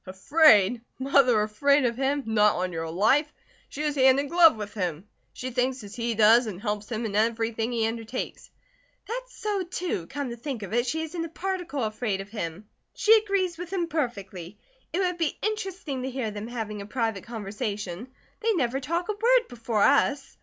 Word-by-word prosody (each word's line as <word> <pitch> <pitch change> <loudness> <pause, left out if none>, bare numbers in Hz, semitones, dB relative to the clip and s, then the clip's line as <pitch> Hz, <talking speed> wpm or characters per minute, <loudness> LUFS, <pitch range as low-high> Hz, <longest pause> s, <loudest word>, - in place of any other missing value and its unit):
"Afraid? 220 - +4 0.2
Mother 260 -4 +4
afraid 280 +6 +2
of 235 -1 0
him? 275 +2 0
Not 210 -2 +3
on 180 0 -2
your 165 0 -3
life. 240 - +2 0.4
She 300 - -5
is 300 -1 0
hand 265 -1 +5
in 285 0 -2
glove 340 -4 +6
with 210 -1 -6
him. 180 -2 -3 0.2
She 255 0 -6
thinks 250 0 -1
as 205 0 -10
he 235 -1 -2
does, 225 +3 +6
and 190 -4 -6
helps 210 +1 -3
him 225 0 -2
in 205 -2 -3
everything 225 +1 0
he 230 -2 +1
undertakes." 225 +2 -5 0.6
"That's - - -6
so, 415 -2 -1
too. 350 - -3
Come 285 -4 -4
to - - -5
think 240 -2 -5
of 200 - -7
it, 240 +2 +1
she 320 +5 -1
isn't 330 +1 -4
a - - -7
particle 355 -5 -3
afraid 215 -2 -2
of 195 +1 -7
him. 200 -2 -5 0.3
She 440 +1 +6
agrees 395 -5 0
with 355 0 -7
him 370 -3 0
perfectly. 200 - -4 0.3
It 365 - 0
would 360 -2 -1
be 325 -3 0
interesting 385 -10 -3
to 260 - -3
hear 255 -4 -3
them 210 +1 -6
having 220 -4 -5
a 200 - -8
private 225 -4 -2
conversation. 205 -2 -5 0.3
They 455 -1 +1
never 270 - 0
talk 335 +6 -2
a - - 0
word 475 +4 +3
before 230 -3 -1
us. 280 -1 +2
245 Hz, 195 wpm, -26 LUFS, 210-310 Hz, 0.6 s, glove